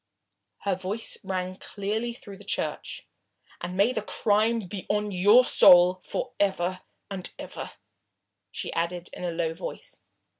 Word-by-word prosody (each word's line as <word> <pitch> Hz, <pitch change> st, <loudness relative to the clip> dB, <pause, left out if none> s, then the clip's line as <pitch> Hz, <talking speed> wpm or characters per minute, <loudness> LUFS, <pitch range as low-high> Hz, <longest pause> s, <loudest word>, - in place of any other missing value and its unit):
Her 200 Hz, -, 0 dB
voice 190 Hz, +5 st, -2 dB
rang 185 Hz, -1 st, -3 dB
clearly 215 Hz, +5 st, -3 dB
through 200 Hz, -4 st, -12 dB
the -, -, -12 dB
church. 200 Hz, -, -3 dB, 0.6 s
"And 180 Hz, +1 st, -5 dB
may 210 Hz, +6 st, +3 dB
the 220 Hz, -, -1 dB
crime 215 Hz, +2 st, +2 dB
be 190 Hz, 0 st, -7 dB
on 210 Hz, 0 st, 0 dB
your 205 Hz, +7 st, +6 dB
soul 180 Hz, -2 st, +7 dB
for 250 Hz, -, -4 dB
ever 185 Hz, -2 st, 0 dB, 0.3 s
and 190 Hz, -2 st, -5 dB
ever," -, -, -7 dB, 0.8 s
she -, -, -5 dB
added 170 Hz, +1 st, -2 dB
in -, -, -7 dB
a 175 Hz, -, -1 dB
low 165 Hz, -1 st, -1 dB
voice. 165 Hz, -, -8 dB
195 Hz, 145 wpm, -27 LUFS, 180-210 Hz, 0.8 s, soul